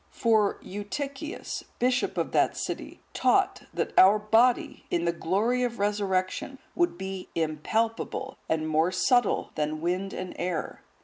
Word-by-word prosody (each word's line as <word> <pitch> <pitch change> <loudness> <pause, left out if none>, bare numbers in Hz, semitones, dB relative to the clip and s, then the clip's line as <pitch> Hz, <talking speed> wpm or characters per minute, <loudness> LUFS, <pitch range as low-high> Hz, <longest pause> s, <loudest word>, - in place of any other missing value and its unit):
For 220 -4 +2
Eutychius,(149) 275 +9 -5
bishop 250 +1 +1
of - - -1
that - - +2
city, - - -5
taught, - - +2
that - - -2
our 195 +3 +8
body, 225 +4 +2
in 170 0 0
the 170 - +3
glory 205 +9 0
of 240 -1 -1
resurrection, 200 +4 -1 0.2
would 345 - +1
be 190 0 -6
impalpable, 220 - -1
and 155 -1 0
more 160 +3 +2
subtile 245 +4 +2
than 155 0 -2
wind 180 +4 -1
and 185 -1 -5
air. 175 -3 -3
200 Hz, 135 wpm, -27 LUFS, 175-240 Hz, 0.2 s, our